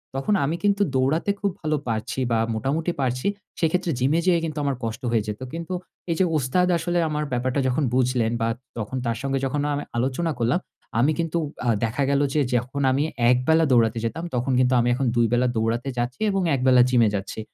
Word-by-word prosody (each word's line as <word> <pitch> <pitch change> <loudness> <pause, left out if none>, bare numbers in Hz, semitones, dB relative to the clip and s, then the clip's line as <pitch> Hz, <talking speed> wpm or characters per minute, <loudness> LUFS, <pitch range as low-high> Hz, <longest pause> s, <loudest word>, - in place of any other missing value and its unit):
তখন 135 +10 0
আমি 155 +4 -1
কিন্তু 205 0 +2
দৌড়াতে 135 +8 +1
খুব 200 0 +1
ভালো 155 -1 0
পারছি 115 +2 -2
বা 115 - +3 0.2
মোটামুটি 150 +9 -1
পারছি 125 +2 -1 0.3
সেক্ষেত্রে 170 +1 +1
জিমে 140 +6 +2
যেয়ে 175 -2 +4
কিন্তু 155 -2 -5
আমার 140 -1 0
কষ্ট 115 0 -4
হয়ে 110 -3 +2
যেত। 105 0 -4
কিন্তু 170 +2 -5 0.4
এই - - +1
যে 190 - +4
ওস্তাদ 150 +7 +1
আসলে 175 +1 -1
আমার 150 0 -1
ব্যাপারটা 130 +2 0
যখন 130 +4 +1
বুঝলেন 125 -3 +1
বা 115 - +2 0.3
তখন 115 +4 -4
তার 115 -1 -1
সঙ্গে 135 0 -1
যখন 140 +2 -1
আমি 145 - -2
আলোচনা 135 +7 0
করলাম 120 +9 +2 0.4
আমি 140 +6 +4
কিন্তু 165 0 -1 0.3
আ - - +2
দেখা 115 +5 0
গেল 140 0 +2
যে 155 - +2 0.2
যখন 125 +4 -1
আমি 135 +3 +1 0.3
১ 125 - +5
বেলা 160 0 +4
দৌড়াতে 115 -2 +3
যেতাম 160 +9 -3
তখন 125 +2 0
কিন্তু 130 0 +3
আমি 120 - +1
এখন 135 +2 -1
২ 120 0 +4
বেলা 125 +1 +3
দৌড়াতে 115 +4 0
যাচ্ছি 120 +1 -2
এবং 195 0 0
১ 135 - -2
বেলা 125 -1 +7
জিম 125 -2 +4
এ - - +2
যাচ্ছি। 100 +2 -5
130 Hz, 210 wpm, -24 LUFS, 120-155 Hz, 0.4 s, বেলা